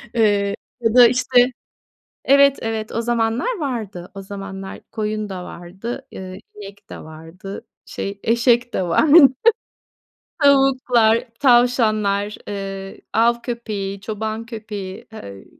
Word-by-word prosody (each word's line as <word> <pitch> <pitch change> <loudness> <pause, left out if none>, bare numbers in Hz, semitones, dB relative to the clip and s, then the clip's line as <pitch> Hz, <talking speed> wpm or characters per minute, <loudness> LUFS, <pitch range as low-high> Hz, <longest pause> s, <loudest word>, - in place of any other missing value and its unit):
Eee, 205 -3 +2 0.3
ya 225 -1 +1
da 245 -1 +9
işte 250 0 +3 0.7
Evet, 280 0 +5
evet, 220 -1 -3
o 230 - -1
zamanlar 235 - -1
vardı. 220 - -5
O 195 - -7
zamanlar 195 0 -8
koyun 215 -1 -3
da 185 -2 -6
vardı, 190 +9 -8
eee, 185 0 -9
inek 200 0 -12
de - - -8
vardı, 165 +5 -10 0.2
şey, 200 0 -6
eşek 235 +1 +2
de - - 0
vardı. 285 - +6 1.2
Tavuklar, 255 -4 +3
tavşanlar, 215 -5 +2
eee, 195 -1 -6
av 235 +1 +2
köpeği, 205 -5 -5
çoban 220 +1 -4
köpeği, 205 -4 -8
eee, 100 - -10
220 Hz, 115 wpm, -20 LUFS, 195-240 Hz, 1.2 s, da